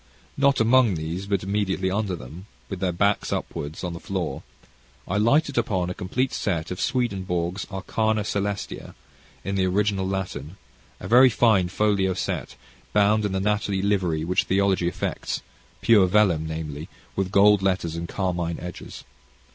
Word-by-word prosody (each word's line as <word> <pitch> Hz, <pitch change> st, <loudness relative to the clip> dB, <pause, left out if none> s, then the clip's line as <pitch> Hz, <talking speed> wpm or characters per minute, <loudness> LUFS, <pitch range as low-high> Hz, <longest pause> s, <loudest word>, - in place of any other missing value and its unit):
Not 140 Hz, 0 st, +3 dB
among 115 Hz, -2 st, +4 dB
these, 85 Hz, +5 st, -4 dB
but 100 Hz, -2 st, 0 dB
immediately 95 Hz, -1 st, -1 dB
under 100 Hz, -2 st, -1 dB
them, 80 Hz, +7 st, -10 dB, 0.2 s
with 95 Hz, -, -4 dB
their 95 Hz, -1 st, 0 dB
backs 100 Hz, +4 st, +1 dB
upward, 75 Hz, +2 st, -4 dB
on 90 Hz, -1 st, -3 dB
the 85 Hz, -, -7 dB
floor, 90 Hz, -8 st, -3 dB, 0.7 s
I 95 Hz, -, -1 dB
lighted 135 Hz, +5 st, +3 dB
upon 95 Hz, -6 st, -1 dB
a -, -, -3 dB
complete 125 Hz, +10 st, -2 dB
set 85 Hz, -5 st, -2 dB
of 90 Hz, -, -4 dB
Swedenborg's 95 Hz, -6 st, -1 dB
"Arcana 110 Hz, +2 st, 0 dB
Caelestia," 100 Hz, 0 st, -3 dB, 0.5 s
in 100 Hz, -, -3 dB
the 95 Hz, -1 st, +1 dB
original 100 Hz, 0 st, +1 dB
Latin, 95 Hz, -4 st, -4 dB, 0.4 s
a -, -, -7 dB
very 125 Hz, +3 st, +7 dB
fine 110 Hz, -6 st, +3 dB
folio 95 Hz, -1 st, +1 dB
set, -, -, -3 dB, 0.4 s
bound 105 Hz, +1 st, +3 dB
in 100 Hz, -, -1 dB
the 95 Hz, -, -1 dB
natty 100 Hz, -1 st, 0 dB
livery 90 Hz, -6 st, 0 dB
which 90 Hz, +2 st, +1 dB
theology 95 Hz, -2 st, +2 dB
affects, 90 Hz, -, -3 dB, 0.4 s
pure 105 Hz, -5 st, +5 dB
vellum, 90 Hz, -5 st, +3 dB
namely, 80 Hz, -1 st, -5 dB, 0.4 s
gold 100 Hz, +1 st, +5 dB
letters, 90 Hz, -4 st, 0 dB
and 85 Hz, 0 st, -5 dB
carmine 90 Hz, -3 st, -2 dB
edges. 90 Hz, 0 st, -8 dB
95 Hz, 150 wpm, -24 LUFS, 90-105 Hz, 0.7 s, very